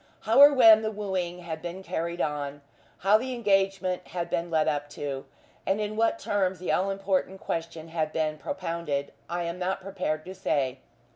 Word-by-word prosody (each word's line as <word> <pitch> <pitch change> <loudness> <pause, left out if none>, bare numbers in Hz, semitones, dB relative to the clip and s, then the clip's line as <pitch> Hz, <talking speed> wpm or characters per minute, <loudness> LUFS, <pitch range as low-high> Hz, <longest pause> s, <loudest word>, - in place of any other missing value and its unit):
How 225 +4 +3
or 285 +1 +11
when 225 -5 +8
the 220 - -1
wooing 190 -4 -3
had 160 -2 -6
been 175 +3 -6
carried 170 0 -3
on, 145 -1 -3 0.4
how 210 +2 +6
the 255 +1 -3
engagement 195 -4 +1
had 175 0 -4
been 170 +1 -1
led 160 -2 +2
up 145 -1 -1
to, 140 -2 -4 0.4
and 195 +2 0
in 210 0 -2
what 225 +1 +2
terms 190 -2 0
the 180 - -2
all 190 +2 +2
important 195 -1 -1
question 165 -2 -4
had 160 -2 -1
been 155 -1 -1
propounded, 165 -7 -3 0.2
I 175 0 -2
am 170 +1 -4
not 185 +1 -1
prepared 185 -5 -3
to 185 - -7
say. 135 -8 -1
180 Hz, 185 wpm, -27 LUFS, 160-195 Hz, 0.4 s, or